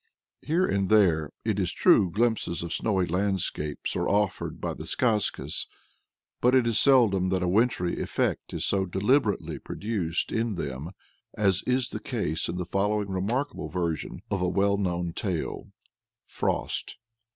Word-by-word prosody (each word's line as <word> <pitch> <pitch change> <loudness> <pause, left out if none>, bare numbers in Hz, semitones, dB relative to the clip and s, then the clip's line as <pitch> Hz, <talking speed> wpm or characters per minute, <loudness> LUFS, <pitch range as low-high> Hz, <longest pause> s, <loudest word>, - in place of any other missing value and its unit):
Here 170 +5 +1
and 100 - 0
there, 85 -9 +4 0.2
it - - 0
is - - 0
true, 95 - +4
glimpses 105 -3 0
of 85 -1 -3
snowy 95 -2 +1
landscapes 90 -4 -1
are - - 0
offered 100 -2 0
by - - -3
the - - -8
skazkas. 110 -5 0 0.7
But 125 +2 +4
it 130 -2 +4
is 115 -2 +3
seldom 110 -9 +4
that 95 -1 0
a - - 0
wintry 95 -2 +1
effect - - -1
is - - -2
so 95 -1 +1
deliberately 105 +4 +1
produced 95 -6 -2
in 115 -2 -1
them 70 -1 -4 0.5
as 100 -2 +2
is 125 -1 +1
the - - -4
case 80 +2 -2
in 85 - -3
the 90 - -3
following 100 +3 0
remarkable 115 +10 -2
version 85 -3 -3
of 100 -2 0
a 90 - +1
well 100 +2 +2
known 85 -3 -1
tale. 90 -4 -3 0.6
FROST. - - -2
100 Hz, 150 wpm, -27 LUFS, 90-110 Hz, 0.7 s, there